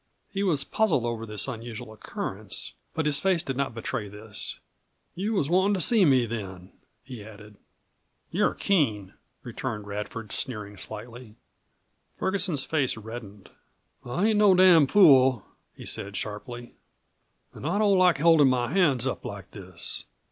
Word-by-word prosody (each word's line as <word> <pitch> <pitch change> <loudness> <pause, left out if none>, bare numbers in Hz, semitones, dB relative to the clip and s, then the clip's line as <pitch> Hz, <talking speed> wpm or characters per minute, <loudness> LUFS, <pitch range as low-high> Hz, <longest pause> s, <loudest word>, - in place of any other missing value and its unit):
He 195 - -2
was 165 -8 +2
puzzled 185 - +1
over 115 -1 -3
this 105 +2 -2
unusual 115 -2 -7
occurrence, 110 - -5 0.2
but 160 - -1
his 145 -1 +1
face 185 -4 +1
did 135 -5 -3
not 135 -3 -2
betray 110 -2 -4
this. 105 +1 -6 0.5
"You 205 +5 -2
was 170 -9 +1
wantin' 190 +5 +3
to - - -2
see 215 +1 +4
me 130 -5 +4
then," 95 -5 -7 0.3
he 125 -5 -9
added. 105 0 -13 0.8
"You're - - +1
keen," 110 - 0 0.3
returned 105 -2 -5
Radford, 105 +1 -6
sneering 105 -6 -4
slightly. 110 +2 -9 0.8
Ferguson's 180 -7 -1
face 140 -7 0
reddened. 110 -3 -10 0.5
"I 175 - 0
ain't 215 -1 +2
no 205 -3 +6
damn 180 -5 +7
fool," 130 - +6 0.3
he - - -11
said 100 0 -2
sharply. 120 +3 -6 0.8
"An' - - -11
I 175 +6 0
don't 205 -2 +4
like 185 -2 +4
holdin' 160 -1 +5
my 125 -2 0
hands 145 -10 +3
up 130 - -3
like 100 -2 -8
this. 90 -4 -5
125 Hz, 150 wpm, -26 LUFS, 105-170 Hz, 0.8 s, damn